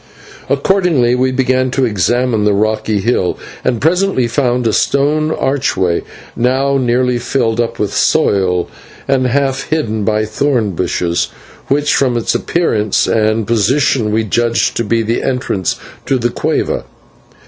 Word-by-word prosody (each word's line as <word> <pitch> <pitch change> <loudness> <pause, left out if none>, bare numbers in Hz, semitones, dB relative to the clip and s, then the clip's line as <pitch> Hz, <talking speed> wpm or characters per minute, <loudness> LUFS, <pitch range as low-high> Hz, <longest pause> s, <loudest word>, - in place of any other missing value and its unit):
Accordingly 140 -4 +2
we 130 +1 +1
began 130 0 +1
to 130 +1 +1
examine 115 +2 +1
the 105 -1 +2
rocky 110 0 0
hill, 95 -4 0 0.3
and 120 -3 0
presently 175 - +1
found 125 0 0
a 110 - +1
stone 150 +2 +1
archway, 130 - 0 0.3
now 130 +3 +1
nearly 125 0 +1
filled 120 -2 0
up 115 - -3
with 105 -2 -2
soil 90 -3 +1 0.4
and 130 -2 +2
half 135 +1 -1
hidden 110 -9 -1
by 110 +1 +1
thorn 115 -1 0
bushes, 85 -1 -1 0.4
which 145 +1 +1
from 125 -3 +1
its 115 - 0
appearance 110 - 0
and 110 0 +1
position 115 +1 +1
we 110 +1 +1
judged 115 +2 0
to 115 - 0
be 115 +1 0
the 115 +2 -1
entrance 125 -8 -1 0.3
to 135 - +2
the 120 -1 0
/cueva - - -1
120 Hz, 140 wpm, -15 LUFS, 110-135 Hz, 0.4 s, Accordingly